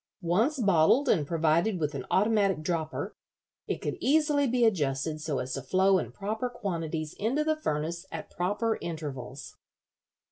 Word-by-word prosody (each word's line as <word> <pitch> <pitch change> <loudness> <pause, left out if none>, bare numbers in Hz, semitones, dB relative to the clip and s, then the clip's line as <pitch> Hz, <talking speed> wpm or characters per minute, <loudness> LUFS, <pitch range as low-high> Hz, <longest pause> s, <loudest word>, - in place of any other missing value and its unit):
Once 220 - +2
bottled 200 - +4
and 150 -7 +2
provided 165 +5 +2
with 150 -1 -1
an 135 -2 -5
automatic 200 -5 +2
dropper, 160 -2 -2 0.5
it - - -3
could - - -3
easily 295 0 +3
be 245 -1 +3
adjusted 155 -5 0
so 150 -3 -2
as 125 0 -3
to 135 - -3
flow 190 +8 +3
in - - -5
proper 220 +5 -3
quantities 165 -9 -3
into 250 +9 +1
the 310 0 +1
furnace 170 - -3
at - - -7
proper 205 +5 -1
intervals." 145 -5 -6
175 Hz, 150 wpm, -29 LUFS, 155-225 Hz, 0.5 s, bottled